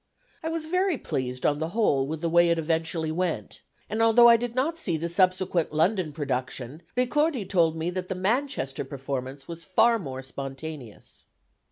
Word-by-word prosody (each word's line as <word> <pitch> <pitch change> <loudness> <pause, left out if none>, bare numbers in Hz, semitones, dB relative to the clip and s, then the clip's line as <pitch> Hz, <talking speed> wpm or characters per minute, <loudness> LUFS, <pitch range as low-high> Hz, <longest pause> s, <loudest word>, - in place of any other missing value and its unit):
I 320 - -3
was 325 -1 -3
very 365 0 +1
pleased 125 - -3
on 145 0 +2
the 160 +1 -2
whole 140 -12 +2
with 155 +1 -4
the 170 - 0
way 170 0 +5
it 170 - +2
eventually 160 0 -1
went, 160 - -3 0.3
and 220 +1 -2
although 225 +1 +7
I 235 - +8
did 235 0 -3
not 320 +6 0
see 175 - -1
the 165 +2 -2
subsequent 185 -2 +1
London 170 +1 +1
production, 135 -1 -4 0.2
Ricordi 255 - +1
told 170 -5 +2
me 165 +2 -2
that 185 0 -4
the 190 - -2
Manchester 190 - -1
performance 135 0 -5
was 170 0 -7
far 230 +6 +3
more 135 -7 -6
spontaneous." 135 -2 -8
170 Hz, 175 wpm, -26 LUFS, 140-225 Hz, 0.3 s, I